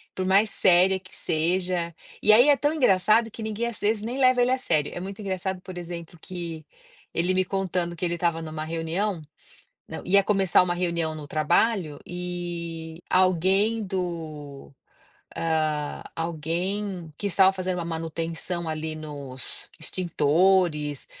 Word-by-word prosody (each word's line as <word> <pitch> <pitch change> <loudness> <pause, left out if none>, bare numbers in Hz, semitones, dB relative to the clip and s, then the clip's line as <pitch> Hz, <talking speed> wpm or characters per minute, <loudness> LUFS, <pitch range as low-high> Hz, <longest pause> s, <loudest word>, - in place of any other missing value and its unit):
por 185 - -2
mais 200 +3 +4
séria 185 +1 +4
que 185 0 -11
seja, 175 +1 0 0.3
e 215 - +5
aí 240 +6 +7
é 290 - +7
tão 290 +1 +1
engraçado 225 - +3
que 225 - -9
ninguém 220 +1 -2
às 235 - -6
vezes 210 +1 0
nem 245 +4 -3
leva 255 -1 +5
ele 250 - +2
a 260 - +3
sério, 155 - +1
é - - -4
muito 195 +3 -7
engraçado 190 -1 -3
por 185 0 -9
exemplo 170 -1 -7
que, 170 -4 -6 0.5
ele 175 +2 +2
me 185 0 +3
contando 180 -2 -1
que 170 - -2
ele 170 - 0
estava 170 -1 0
em 160 - -6
uma 155 0 -4
reunião 165 +4 -2 0.7
não, 160 - -7
ia 200 +2 +5
começar 195 -3 +4
uma 175 -1 0
reunião 170 -3 -1
no 150 -1 -7
trabalho, 160 +2 +1
e, 175 -2 -5
alguém 190 +5 +3
do 165 -7 -5 0.7
ah, 155 -2 -1
alguém 170 +2 -3
que 205 - -3
estava 190 +1 +5
fazendo 185 -1 -2
uma 170 - -3
manutenção 165 +1 -3
ali 155 0 -3
nos 140 -4 -6
extintores, 165 -3 +2
175 Hz, 155 wpm, -26 LUFS, 160-190 Hz, 0.7 s, aí